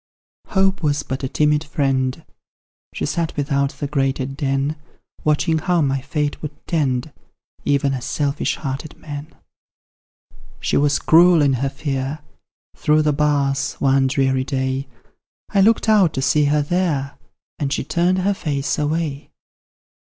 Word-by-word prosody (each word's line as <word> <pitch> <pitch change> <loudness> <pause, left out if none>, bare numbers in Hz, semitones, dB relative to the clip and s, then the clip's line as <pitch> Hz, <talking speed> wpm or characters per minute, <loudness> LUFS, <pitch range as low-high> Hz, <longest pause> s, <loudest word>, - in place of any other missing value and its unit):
Hope 195 -1 +1
Was 145 -2 0
but 130 +1 -5
a 130 - -1
timid 150 +1 +2
friend; 135 -1 -1 0.7
She - - -3
sat 165 -2 -2
without 140 -1 +1
the - - -5
grated 135 -1 -1
den, 140 +1 -1 0.5
Watching 155 +1 +2
how 175 +2 +1
my 135 -2 0
fate 145 +1 -2
would 150 -1 -5
tend, 140 -3 -1 0.5
Even 140 -1 +2
as 130 -2 -4
selfish 145 +2 -1
hearted 140 +2 -5
men. 145 0 -7 1.3
She - - -1
was 145 0 +3
cruel 170 -1 +5
in 140 -2 +3
her 135 - +1
fear; 135 0 -3 0.6
Through 155 +1 +2
the 150 -1 +2
bars 140 -2 +1
one 135 -1 +2
dreary 130 -1 +1
day, 130 0 -2 0.6
I 195 - +2
looked 225 +3 +3
out 200 -7 +4
to 135 - -1
see 150 +3 +3
her 145 +1 +2
there, 145 -4 -1 0.4
And 140 -2 -1
she - - -1
turned 175 +6 +1
her 195 +2 +1
face 145 -6 -2
away! 150 -1 -2
145 Hz, 145 wpm, -20 LUFS, 135-155 Hz, 1.3 s, cruel